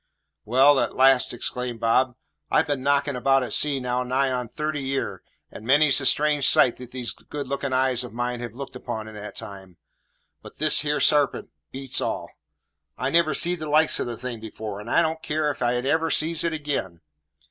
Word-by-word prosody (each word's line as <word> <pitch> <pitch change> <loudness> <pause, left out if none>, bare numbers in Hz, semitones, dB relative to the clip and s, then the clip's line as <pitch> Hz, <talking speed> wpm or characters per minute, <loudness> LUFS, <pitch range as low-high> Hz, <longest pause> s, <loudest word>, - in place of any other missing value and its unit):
"Well," 135 +5 +5
at - - -1
last 135 -1 +5
exclaimed 125 0 -4
Bob, 120 +2 +2 0.3
"I've - - +3
been 145 -3 -2
knocking 140 +1 +1
about 135 +1 +2
at 125 - -4
sea 145 -2 +2
now 125 0 -1
nigh 130 +2 0
on 125 -2 -3
thirty 150 +2 -3
year, 135 0 -3 0.3
and - - -10
many's 140 +4 +5
the 135 - +1
strange 150 -2 +3
sight 120 - +4
these 125 -1 -5
good 145 -2 -8
looking 140 0 -3
eyes 130 -1 +1
of 125 - -8
mine 120 +1 -3
have 120 -1 -7
looked 135 0 -8
upon 110 -3 -6
in 110 - -10
that 105 0 -9
time; 95 -3 -10 0.6
but - - -13
this 155 +1 +3
here 150 0 -1
sarpent 145 -3 +1 0.2
beats 135 -1 -1
all. - - -3 0.7
I 130 +4 -2
never 165 -2 +3
seed 175 +3 0
the 155 -1 -5
likes 155 +1 +3
of - - -2
the 120 -1 -5
thing 120 -2 -7
afore, 110 -2 -7
and 105 +3 -9
I 170 - +3
don't 160 0 -2
care 150 -1 -1
if 140 - -10
I 120 0 +1
never 160 +5 0
sees 160 +1 0
it 170 - 0
ag'in. 145 - -4
130 Hz, 200 wpm, -24 LUFS, 120-145 Hz, 0.7 s, Well